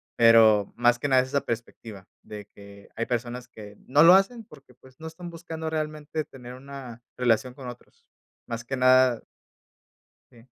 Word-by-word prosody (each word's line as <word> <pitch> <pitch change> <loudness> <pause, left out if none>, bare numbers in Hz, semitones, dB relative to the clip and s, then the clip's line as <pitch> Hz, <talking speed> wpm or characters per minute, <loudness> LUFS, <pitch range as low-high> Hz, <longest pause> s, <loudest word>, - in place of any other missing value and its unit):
pero 110 -3 +5
más 120 0 +2
que 145 - -2
nada 130 -1 +4
es 130 - -9
esa 140 +1 0
perspectiva 110 -4 -7 0.2
de 105 -1 -10
que 100 0 -15
hay 115 - -2
personas 120 0 -4
que 105 -3 -13
no 145 +4 +4
lo 170 +2 +8
hacen 220 +5 +2
porque, 140 -6 -18
pues, 130 +2 -21
no 160 - -8
están 170 +2 -9
buscando 160 -1 -7
realmente 155 0 -4
tener 125 -2 -12
una 130 -2 -11 0.2
relación 125 0 +1
con 130 -2 -10
otros. 120 0 -13 0.4
Más 115 -1 -5
que 135 +3 -4
nada 130 -1 +4 1.1
Sí. 115 0 -19
125 Hz, 170 wpm, -25 LUFS, 115-145 Hz, 1.1 s, lo